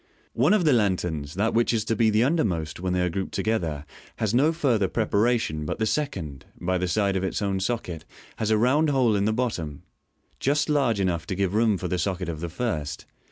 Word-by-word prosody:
One 210 Hz, -, +4 dB
of 185 Hz, -5 st, +1 dB
the 150 Hz, -, +5 dB
lan 100 Hz, -6 st, +3 dB
terns, 80 Hz, -5 st, -3 dB
viz., 75 Hz, -, -10 dB
that 110 Hz, +4 st, +1 dB
which 115 Hz, +1 st, +2 dB
is 110 Hz, -, -1 dB
to 115 Hz, -, 0 dB
be 110 Hz, 0 st, +3 dB
undermost 90 Hz, -, 0 dB
when 90 Hz, +1 st, -2 dB
they 90 Hz, -, +1 dB
are 90 Hz, -, +1 dB
grouped 95 Hz, +2 st, -4 dB
together, 80 Hz, -10 st, -1 dB, 0.3 s
has 110 Hz, -1 st, -1 dB
no 140 Hz, +6 st, +4 dB
further 125 Hz, -, +1 dB
preparation 110 Hz, -4 st, +1 dB
j 75 Hz, -, -4 dB
but -, -, -3 dB
the 110 Hz, -, 0 dB
second, 95 Hz, -, -3 dB, 0.2 s
by 90 Hz, +1 st, 0 dB
the 90 Hz, -, -1 dB
side 100 Hz, +1 st, +1 dB
of 95 Hz, -, -1 dB
its 95 Hz, -, -1 dB
own 100 Hz, -2 st, -1 dB
socket, 95 Hz, -6 st, -3 dB, 0.3 s
has 110 Hz, -, -1 dB
a 110 Hz, -, +4 dB
round 140 Hz, +8 st, +3 dB
hole 130 Hz, -6 st, +3 dB
in 100 Hz, 0 st, +1 dB
the 110 Hz, -, +2 dB
bottom, 90 Hz, -, -3 dB, 0.6 s
just 145 Hz, +2 st, +1 dB
large 135 Hz, -7 st, +2 dB
enoueh 90 Hz, -4 st, 0 dB
to 95 Hz, -, -2 dB
give 95 Hz, 0 st, 0 dB
room 110 Hz, -2 st, +3 dB
for 90 Hz, -, -4 dB
the 90 Hz, +1 st, -1 dB
socket 90 Hz, 0 st, -2 dB
of 80 Hz, -2 st, -4 dB
the 85 Hz, +1 st, -4 dB
first. 80 Hz, -7 st, -3 dB
100 Hz, 230 wpm, -25 LUFS, 90-120 Hz, 0.6 s, the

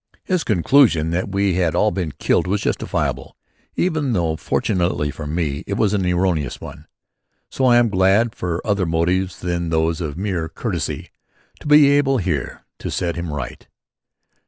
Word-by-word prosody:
His 185 Hz, -3 st, 0 dB
conclusion 95 Hz, -, +3 dB
that 90 Hz, +3 st, -2 dB
we 100 Hz, -1 st, +1 dB
had 85 Hz, -3 st, +1 dB
all 105 Hz, +4 st, +3 dB
been 90 Hz, -5 st, -3 dB
killed -, -, +1 dB
was 100 Hz, +2 st, 0 dB
justifiable -, -, -2 dB, 0.4 s
even 155 Hz, -7 st, 0 dB
though, 85 Hz, -5 st, 0 dB
fortunately 85 Hz, -3 st, -1 dB
for 75 Hz, 0 st, -7 dB
me, 75 Hz, -2 st, -2 dB
it 100 Hz, -, -2 dB
was 105 Hz, -2 st, +1 dB
an 95 Hz, -3 st, 0 dB
erroneous 90 Hz, -6 st, 0 dB
one. 75 Hz, +1 st, -10 dB, 0.6 s
So 130 Hz, -, 0 dB
I 120 Hz, -1 st, +6 dB
am 120 Hz, -1 st, +4 dB
glad 100 Hz, +4 st, +3 dB
for 90 Hz, -6 st, -4 dB
other 100 Hz, -4 st, 0 dB
motives 90 Hz, +3 st, 0 dB
than 85 Hz, -1 st, -2 dB
those 80 Hz, +1 st, 0 dB
of 75 Hz, -2 st, -4 dB
mere 90 Hz, -4 st, -2 dB
courtesy -, -, -4 dB, 0.5 s
to -, -, -9 dB
be 150 Hz, -1 st, +7 dB
able 140 Hz, -2 st, +3 dB
here 90 Hz, -, -3 dB, 0.2 s
to -, -, -5 dB
set 85 Hz, -2 st, -2 dB
him 85 Hz, -2 st, -4 dB
right. 75 Hz, -4 st, -6 dB
90 Hz, 165 wpm, -20 LUFS, 80-105 Hz, 0.6 s, be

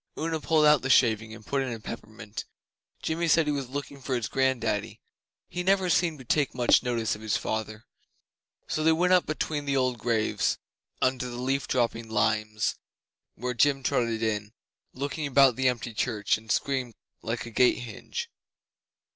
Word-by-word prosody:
Una 160 Hz, 0 st, -1 dB
pulled 155 Hz, 0 st, +3 dB
out 150 Hz, -2 st, +6 dB
the 135 Hz, -, -3 dB
shaving 110 Hz, -4 st, +4 dB
and 110 Hz, -1 st, -11 dB
put 140 Hz, -1 st, 0 dB
in 130 Hz, -2 st, -2 dB
a 115 Hz, -, -5 dB
peppermint. 110 Hz, -1 st, -8 dB, 0.6 s
Jimmy 165 Hz, +1 st, 0 dB
said 165 Hz, 0 st, +4 dB
he 150 Hz, -, 0 dB
was 140 Hz, -3 st, -3 dB
looking 140 Hz, 0 st, -6 dB
for 130 Hz, 0 st, -2 dB
his 120 Hz, -3 st, -1 dB
grand 130 Hz, -2 st, +1 dB
daddy -, -, -2 dB, 0.5 s
he 180 Hz, -, -4 dB
never 190 Hz, 0 st, +2 dB
seemed 165 Hz, -2 st, +2 dB
to 130 Hz, -, -12 dB
take 140 Hz, +2 st, +1 dB
much 120 Hz, -1 st, +4 dB
notice 120 Hz, -3 st, -1 dB
of 105 Hz, -, -7 dB
his 110 Hz, -2 st, 0 dB
father 110 Hz, 0 st, -4 dB, 0.8 s
so 155 Hz, -, -1 dB
they 160 Hz, -, +5 dB
went 180 Hz, +3 st, +3 dB
up 180 Hz, -, +4 dB
between 155 Hz, -1 st, -2 dB
the 140 Hz, -1 st, +1 dB
old 130 Hz, -2 st, +1 dB
graves, 110 Hz, -1 st, 0 dB, 0.5 s
under 130 Hz, -1 st, +1 dB
the 120 Hz, -, -6 dB
leaf 135 Hz, +2 st, -1 dB
dropping 115 Hz, -2 st, 0 dB
limes, 110 Hz, 0 st, +1 dB
to -, -, -3 dB, 0.6 s
the -, -, -23 dB
porch, -, -, -13 dB
where 125 Hz, 0 st, 0 dB
Jim 135 Hz, +3 st, +2 dB
trotted 115 Hz, -2 st, 0 dB
in, 105 Hz, -1 st, -2 dB, 0.4 s
looked 140 Hz, +4 st, -4 dB
about 140 Hz, -4 st, +4 dB
the 130 Hz, +1 st, +1 dB
empty 120 Hz, -2 st, -4 dB
Church, 110 Hz, -2 st, 0 dB
and 110 Hz, 0 st, -7 dB
screamed 130 Hz, -4 st, -1 dB, 0.3 s
like 115 Hz, +1 st, -3 dB
a 120 Hz, -, -8 dB
gate 125 Hz, +2 st, +4 dB
hinge. 125 Hz, -, -6 dB
125 Hz, 190 wpm, -27 LUFS, 110-145 Hz, 0.8 s, out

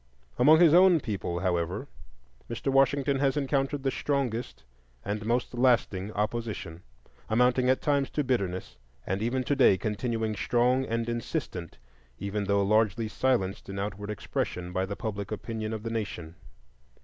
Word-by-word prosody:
Among 155 Hz, +6 st, +7 dB
his 170 Hz, -3 st, +6 dB
own 180 Hz, -1 st, +7 dB
people, 95 Hz, -, -3 dB
however, 85 Hz, -3 st, -1 dB, 0.6 s
Mr. 120 Hz, +4 st, -2 dB
Washington 135 Hz, 0 st, +3 dB
has 140 Hz, +1 st, +1 dB
encountered 135 Hz, 0 st, 0 dB
the 135 Hz, -, +1 dB
strongest 125 Hz, -, -2 dB, 0.4 s
and 105 Hz, +1 st, -3 dB
most 120 Hz, +2 st, 0 dB
lasting 120 Hz, -6 st, +2 dB
opposition, 105 Hz, -6 st, -3 dB, 0.5 s
amounting 125 Hz, +2 st, +3 dB
at 130 Hz, -, +2 dB
times 140 Hz, -2 st, +1 dB
to 150 Hz, -, 0 dB
bitterness, 100 Hz, -9 st, -2 dB, 0.3 s
and 95 Hz, +2 st, -2 dB
even 125 Hz, +3 st, 0 dB
today 135 Hz, -8 st, +4 dB
continuing 110 Hz, +1 st, -2 dB
strong 125 Hz, +4 st, +2 dB
and 115 Hz, -1 st, -2 dB
insistent 120 Hz, -, -4 dB, 0.4 s
even 100 Hz, +3 st, -3 dB
though 100 Hz, 0 st, +2 dB
largely 110 Hz, +2 st, +2 dB
silenced 105 Hz, -6 st, -1 dB
in 100 Hz, -, -5 dB
outward 100 Hz, +1 st, -4 dB
expression 90 Hz, -3 st, -3 dB
by 95 Hz, +1 st, 0 dB
the 100 Hz, -, -4 dB
public 100 Hz, -3 st, -5 dB
opinion 110 Hz, 0 st, -4 dB
of 110 Hz, -1 st, -5 dB
the 115 Hz, -, -4 dB
nation. 95 Hz, -8 st, -4 dB
115 Hz, 145 wpm, -28 LUFS, 100-130 Hz, 0.6 s, Among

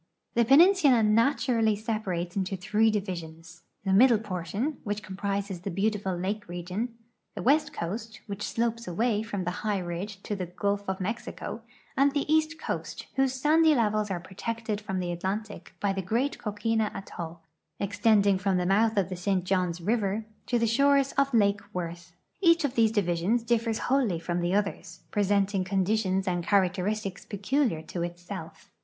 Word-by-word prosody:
The 235 Hz, 0 st, +3 dB
peninsula 290 Hz, -, +6 dB
naturally 225 Hz, 0 st, +3 dB
separates 200 Hz, -5 st, -3 dB
into 195 Hz, -1 st, -1 dB
three 215 Hz, +4 st, +2 dB
divisions; 170 Hz, -5 st, -5 dB, 0.2 s
the 190 Hz, -, +2 dB
middle 235 Hz, +3 st, +6 dB
portion, 205 Hz, -, -3 dB
which 205 Hz, -1 st, -3 dB
comprises 195 Hz, 0 st, -3 dB
the 190 Hz, -, -5 dB
beautiful 195 Hz, 0 st, -1 dB
lake 200 Hz, +4 st, -3 dB
region; 180 Hz, +7 st, -4 dB, 0.4 s
the -, -, -5 dB
west 295 Hz, +3 st, +3 dB
coast, 220 Hz, -, -5 dB
which 200 Hz, -1 st, -6 dB
slopes 230 Hz, +1 st, -1 dB
away 210 Hz, +4 st, +1 dB
from 205 Hz, -3 st, -4 dB
the 180 Hz, -, -1 dB
high 210 Hz, -2 st, 0 dB
ridge 185 Hz, +3 st, -5 dB
to 210 Hz, -, -3 dB
the 185 Hz, -3 st, -4 dB
gulf 200 Hz, +3 st, -1 dB
of 190 Hz, -, -1 dB
INIexico, 215 Hz, +3 st, -5 dB, 0.3 s
and 275 Hz, +1 st, +3 dB
the 285 Hz, -, 0 dB
east 315 Hz, +1 st, +2 dB
coast, -, -, -4 dB
whose 265 Hz, -1 st, +1 dB
sand}^ 310 Hz, +4 st, +4 dB
levels 215 Hz, -3 st, +1 dB
are 185 Hz, -2 st, -2 dB
protected 215 Hz, +3 st, -4 dB
from 195 Hz, -2 st, -3 dB
the 180 Hz, -1 st, -2 dB
Atlantic 200 Hz, +4 st, -4 dB
by 200 Hz, -1 st, +1 dB
the 195 Hz, -, -2 dB
great 235 Hz, +10 st, -1 dB
coquina 215 Hz, +1 st, 0 dB
atoll, 170 Hz, -4 st, -7 dB, 0.4 s
extending 205 Hz, -1 st, +3 dB
from 190 Hz, -1 st, +1 dB
the 180 Hz, -, 0 dB
mouth 215 Hz, +4 st, +3 dB
of 190 Hz, -2 st, +2 dB
the 185 Hz, -, -4 dB
St. 185 Hz, +1 st, 0 dB
Johns 180 Hz, -2 st, 0 dB
river 210 Hz, +1 st, 0 dB, 0.2 s
to 245 Hz, -, +2 dB
the 230 Hz, -, +2 dB
shores 275 Hz, +4 st, +3 dB
of 275 Hz, 0 st, +1 dB
lake 205 Hz, -3 st, +3 dB
Worth. 175 Hz, 0 st, -6 dB, 0.3 s
Each 335 Hz, -4 st, +5 dB
of 265 Hz, -, -1 dB
these 225 Hz, -2 st, +3 dB
divisions 200 Hz, +2 st, +1 dB
differs 230 Hz, -1 st, +1 dB
wholly 250 Hz, -9 st, +1 dB
from 175 Hz, +1 st, -2 dB
the 175 Hz, +2 st, +1 dB
others, 205 Hz, -1 st, -2 dB
presenting 200 Hz, -1 st, +1 dB
con 190 Hz, 0 st, 0 dB
ditions 195 Hz, -2 st, 0 dB
and 175 Hz, -1 st, 0 dB
characteristics 195 Hz, +1 st, 0 dB
peculiar 205 Hz, -, 0 dB
to 170 Hz, +2 st, -5 dB
itself. 175 Hz, +1 st, -7 dB
205 Hz, 165 wpm, -28 LUFS, 185-230 Hz, 0.4 s, peninsula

